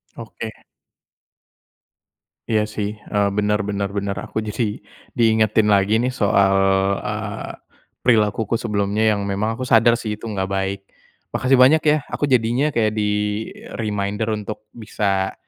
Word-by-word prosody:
Oke. - - -7 2.0
Iya 110 -2 +3
sih. 105 -1 -3 0.2
Eee, 100 -1 +2
benar 105 0 +1
benar 100 -1 -2
benar. 100 0 -3
Aku - - -6
jadi 105 0 -2 0.4
diingetin 110 -1 +3
lagi 105 +1 +3
nih 125 +3 0
soal, 100 -3 +3 0.5
eee, 105 -1 -4 0.5
perilakuku 110 -2 +2
sebelumnya 105 -2 -1 0.2
yang 100 - -3
memang 105 +3 -1
aku 130 - -3
sadar 120 0 +4
sih 110 -3 -4
itu 110 +2 -7
enggak 95 -3 -2
baik. 95 0 -1 0.5
Makasih 130 +1 +3
banyak 135 +5 +6
ya. 150 0 +3
Aku 145 - -2
jadinya 125 +3 +2
kayak 110 -6 +1
di-reminder 105 0 -2
untuk 105 0 -8
bisa 100 -3 -1
105 Hz, 130 wpm, -21 LUFS, 100-115 Hz, 2.0 s, banyak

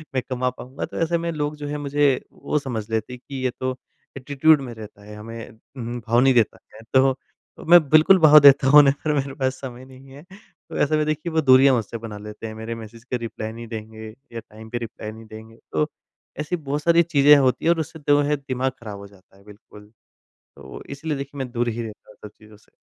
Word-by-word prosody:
मैं 130 - +1
कमा 125 0 -1
पाऊँगा? 130 +2 -7
तो - - -10
ऐसे 170 +1 +1
में 170 0 -3
लोग 150 -1 -3
जो 145 -1 -7
है 150 - -4
मुझे 145 -1 +1
वो 150 - -2
समझ 115 -6 -5
लेते 110 +2 -3
हैं 125 - -9
कि 140 - -8
ये 130 - +2
तो 130 0 -2 0.4
एटीट्यूड 145 +3 +3
में 125 -3 -7
रहता 105 -2 -12
है, 105 - -11
हमें 115 +2 -9
उम 110 - -19 0.3
उम, 120 0 -4
भाव 115 +2 +3
नहीं 135 +1 +4
देता 115 -4 +2 0.2
है 110 - -12
तो 135 0 +5 0.5
अ, - - -9
मैं 175 +2 +8
बिल्कुल 155 +5 +6
भाव 155 -2 +8
देता 140 -2 +6
हूँ 150 +2 +8
उन्हें, 140 -1 +5
पर 150 - +1
मेरे 140 -1 -2
पास 130 -2 -1
समय 130 -1 -8
नहीं 130 +1 -16
है। 145 +3 -13 0.5
तो - - -6
ऐसे 155 +2 +1
में 150 - 0
देखिए 155 +2 -3
वो 160 - +2
दूरियाँ 135 -1 +6
मुझसे 115 0 -3
बना 110 -2 -8
लेते 105 +2 -9
हैं। 110 - -7
मेरे 110 +1 -6
मैसेज 115 0 -11
का 125 0 -3
रिप्लाई 110 -2 -6
नहीं 115 +1 -9
देंगे, 110 0 -8 0.3
या 115 - -5
टाइम 110 0 -14
पे 120 - -3
रिप्लाई 110 -2 -7
नहीं 110 +1 -13
देंगे। 110 +1 -13
तो, 150 - 0 0.5
ऐसी 150 +4 -2
बहुत 145 -2 -4
सारी 170 +1 +4
चीज़ें 150 -3 +5
होती 130 0 +1
हैं 165 - +5
और 165 - -6
उससे 160 0 -6
दो 145 0 +5
है 145 +1 +1
दिमाग 130 -2 -3
ख़राब 105 -3 -8
हो 100 - -10
जाता 95 -1 -23
है 100 - -22
बिल्कुल। 105 0 -16 0.7
तो - - -14
वो - - -9
इसलिए 150 +2 -4
देखिए 140 +1 -7
मैं 130 -2 -4
दूर 120 0 -1
ही 115 +1 -3
रहता 110 -2 -10
हूँ - - -17
सब - - -6
चीज़ों 110 -1 -17
से। 105 - -27
130 Hz, 245 wpm, -22 LUFS, 110-145 Hz, 0.7 s, मैं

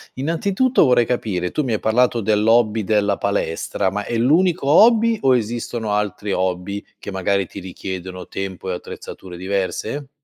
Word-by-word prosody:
innanzitutto 190 - +1
vorrei 125 -3 +4
capire 95 -8 -2
tu 150 - -1
mi 125 - -2
hai 110 - 0
parlato 120 +2 +2
dell'hobby 110 +1 +2
della 105 -1 +2
palestra: 100 -2 -1
ma 105 +2 -3
è 115 - -3
l'unico 160 +5 +2
hobby 225 +7 +5
o 130 -2 +4
esistono 115 -1 -3
altri 105 -1 -2
hobby 95 +2 -2 0.2
che - - -8
magari 95 0 0
ti 100 - -9
richiedono 95 0 -7
tempo 95 -1 -5
e - - -1
attrezzature 90 0 -9
diverse? 100 +8 -3
105 Hz, 150 wpm, -20 LUFS, 95-125 Hz, 0.2 s, hobby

